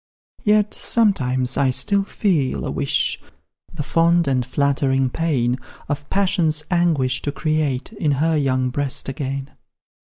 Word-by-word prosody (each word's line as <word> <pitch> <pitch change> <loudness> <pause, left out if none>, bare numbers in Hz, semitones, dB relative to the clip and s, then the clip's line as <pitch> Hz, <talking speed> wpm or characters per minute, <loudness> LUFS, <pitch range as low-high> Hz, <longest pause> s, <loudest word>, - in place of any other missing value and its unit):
"Yet, 210 0 +3
sometimes, 130 - +1
I 135 - +3
still 200 +10 +2
feel 150 - 0
a - - -3
wish, - - 0 0.5
The 160 -3 -5
fond 170 +2 +2
and 130 -2 +1
flattering 135 0 +1
pain 130 -7 0 0.3
Of 145 0 -4
passion's 180 -6 +1
anguish 160 -8 +1
to 145 - -2
create 155 - -1
In 155 -9 0
her 160 +4 +1
young 130 -3 +1
breast 140 0 -1
again. 135 0 -4
145 Hz, 130 wpm, -21 LUFS, 130-170 Hz, 0.5 s, Yet